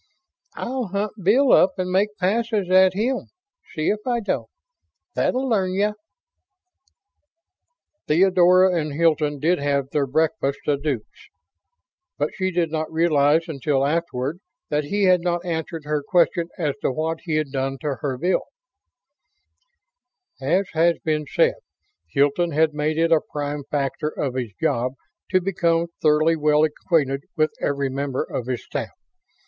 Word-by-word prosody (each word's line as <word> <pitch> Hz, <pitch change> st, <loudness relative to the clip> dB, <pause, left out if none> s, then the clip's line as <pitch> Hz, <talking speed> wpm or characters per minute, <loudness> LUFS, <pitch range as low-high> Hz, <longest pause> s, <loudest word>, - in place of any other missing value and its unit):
"I'll 255 Hz, -2 st, -3 dB
hunt 200 Hz, +2 st, -2 dB
Bill 240 Hz, +9 st, +4 dB
up 185 Hz, 0 st, +5 dB
and 185 Hz, -1 st, -2 dB
make 205 Hz, +3 st, +1 dB
passes 210 Hz, 0 st, 0 dB
at 185 Hz, 0 st, +5 dB
him, 245 Hz, +5 st, -1 dB, 0.5 s
see 155 Hz, -1 st, 0 dB
if 210 Hz, -, 0 dB
I 240 Hz, -1 st, +1 dB
don't. 210 Hz, -, -3 dB, 0.6 s
That'll 260 Hz, +1 st, 0 dB
learn 190 Hz, -6 st, +1 dB
ya!" 205 Hz, +2 st, +1 dB, 2.1 s
Theodora 180 Hz, +1 st, +4 dB
and 150 Hz, -1 st, -4 dB
Hilton 155 Hz, -2 st, +1 dB
did 170 Hz, +5 st, +2 dB
have 140 Hz, -1 st, -1 dB
their 145 Hz, -2 st, 0 dB
breakfast 145 Hz, 0 st, 0 dB
a 145 Hz, -, +2 dB
deux 140 Hz, -5 st, -2 dB, 1.2 s
but -, -, -1 dB
she 185 Hz, -3 st, -1 dB
did 170 Hz, -3 st, -1 dB
not 155 Hz, -1 st, -3 dB
realize 160 Hz, 0 st, +3 dB
until 140 Hz, -2 st, 0 dB
afterward 155 Hz, -1 st, -2 dB, 0.3 s
that 150 Hz, 0 st, 0 dB
he 200 Hz, +7 st, -1 dB
had 185 Hz, -2 st, +4 dB
not 175 Hz, 0 st, -1 dB
answered 165 Hz, -1 st, -4 dB
her 150 Hz, 0 st, -1 dB
question 170 Hz, +2 st, +1 dB
as 150 Hz, -5 st, 0 dB
to -, -, 0 dB
what 160 Hz, +4 st, -2 dB
he 160 Hz, -3 st, -1 dB
had 155 Hz, -3 st, -1 dB
done 135 Hz, 0 st, -2 dB
to 145 Hz, -4 st, -2 dB
her 135 Hz, -3 st, -2 dB
Bill. 180 Hz, +8 st, 0 dB, 2.0 s
As 175 Hz, +9 st, +1 dB
has 165 Hz, +1 st, +3 dB
been 155 Hz, -2 st, 0 dB
said, -, -, +2 dB, 0.5 s
Hilton 145 Hz, +4 st, +1 dB
had 155 Hz, +1 st, +2 dB
made 150 Hz, +1 st, -1 dB
it 165 Hz, 0 st, +2 dB
a 160 Hz, -2 st, +5 dB
prime 145 Hz, -1 st, -5 dB
factor 145 Hz, +1 st, -1 dB
of 140 Hz, -4 st, -3 dB
his 125 Hz, -3 st, -3 dB
job 125 Hz, +2 st, 0 dB, 0.4 s
to 185 Hz, -, +3 dB
become 170 Hz, -2 st, 0 dB
thoroughly 155 Hz, +1 st, +3 dB
well 150 Hz, -1 st, +3 dB
acquainted 150 Hz, -3 st, 0 dB
with 155 Hz, 0 st, +2 dB
every 140 Hz, -1 st, 0 dB
member 135 Hz, -1 st, -2 dB
of 125 Hz, -, -5 dB
his 125 Hz, -2 st, -3 dB
staff. -, -, -5 dB
160 Hz, 150 wpm, -23 LUFS, 145-185 Hz, 2.1 s, up